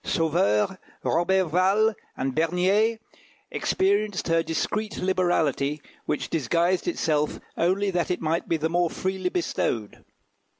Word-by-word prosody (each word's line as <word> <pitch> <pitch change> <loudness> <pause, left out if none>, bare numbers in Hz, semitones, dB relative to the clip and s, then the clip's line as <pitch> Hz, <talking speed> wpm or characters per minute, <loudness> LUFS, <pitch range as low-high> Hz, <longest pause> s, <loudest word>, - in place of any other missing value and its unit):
Sauveur, 165 - +1 0.3
Roberval, 190 +4 +2 0.2
and 135 0 -1
Bernier 185 - +2 0.5
experienced 200 -1 0
her 165 0 +3
discreet 210 +6 -2
liberality, 165 -6 +1 0.3
which 150 - -2
disguised 170 - +1
itself 150 - 0 0.2
only 195 +4 +1
that 175 -2 -1
it 180 - -1
might 165 +1 -1
be 165 - +2
the 160 +1 0
more 175 +1 +1
freely 190 +1 -2
bestowed. 115 - -2
175 Hz, 115 wpm, -25 LUFS, 160-190 Hz, 0.5 s, her